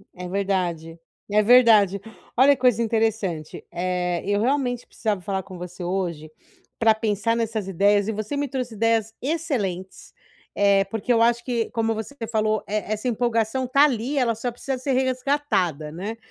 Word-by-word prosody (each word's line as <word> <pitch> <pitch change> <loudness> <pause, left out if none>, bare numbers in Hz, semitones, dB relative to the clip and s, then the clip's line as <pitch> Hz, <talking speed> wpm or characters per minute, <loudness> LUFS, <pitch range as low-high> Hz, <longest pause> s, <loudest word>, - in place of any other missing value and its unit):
É 180 0 -7
verdade 175 -4 -2 0.3
e - - -2
é 210 - +5
verdade. 215 -5 +5 0.3
Olha 275 +3 +6
que - - -19
coisa 245 -3 +3
interessante, 220 -8 -1
eh, 180 -1 -2
eu 205 +1 +1
realmente 250 -1 0
precisava 210 -5 -2
falar 190 +1 -3
com 185 -3 -11
você 180 0 -8
hoje 170 -4 -3 0.5
pra 225 -1 +5
pensar 220 +1 0
nessas 220 -3 -2
ideias 200 +2 +2
e - - 0
você 215 +6 -4
me 285 0 -1
trouxe 250 -3 -4
ideias 225 0 +1
excelentes, 245 - -3 0.4
eh, 200 -1 +4
porque 225 +4 -1
eu 230 - +3
acho 235 0 +3
que 235 -3 -1
como 225 -1 0
você 220 +6 -6 0.2
falou, 215 -1 +1
eh, 215 0 -2
essa 215 +4 -3
empolgação 235 +1 0
tá 275 +3 +5
ali 265 0 +1
ela 240 -3 +2
só 240 +3 -3
precisa 260 +2 -4
ser 265 +1 -1
resgatada, 255 - 0
né, 200 +7 -5
220 Hz, 170 wpm, -23 LUFS, 195-245 Hz, 0.5 s, Olha